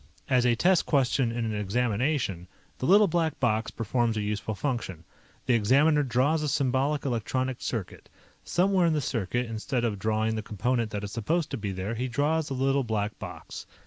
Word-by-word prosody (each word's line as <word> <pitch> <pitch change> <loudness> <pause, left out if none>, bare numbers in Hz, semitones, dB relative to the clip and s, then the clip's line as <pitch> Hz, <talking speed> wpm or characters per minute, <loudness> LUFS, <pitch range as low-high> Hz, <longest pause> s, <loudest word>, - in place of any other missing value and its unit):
As 125 -2 +3
a 120 - +3
test 180 +7 +3
question 135 -3 +2
in 115 0 -2
an 110 - -2
examination, 105 - -1 0.3
the 130 - -1
Little 205 +3 +6
Black 165 -3 0
Box 110 -3 +1
performs 115 0 -1
a 105 - -1
useful 105 +1 -3
function. 110 - -3 0.4
The 125 - +2
examiner 140 +8 +4
draws 140 +4 +1
a 150 - -1
symbolic 140 +1 0
electronic 130 +1 -1
circuit. 110 -7 -5 0.3
Somewhere 185 0 +2
in 165 - +2
the 155 - +1
circuit, 120 -2 -1
instead 115 +2 -2
of 105 -4 -2
drawing 110 +2 0
the 110 - -2
component 115 +3 -1
that 105 -1 -4
is 100 - -5
supposed 150 +10 -1
to - - -2
be 100 -2 -3
there, 95 +4 -3
he 125 +3 -2
draws 150 +5 0
a 135 - -3
Little 135 +1 +1
Black 110 -2 -2
Box. - - -8
125 Hz, 185 wpm, -27 LUFS, 110-140 Hz, 0.4 s, Little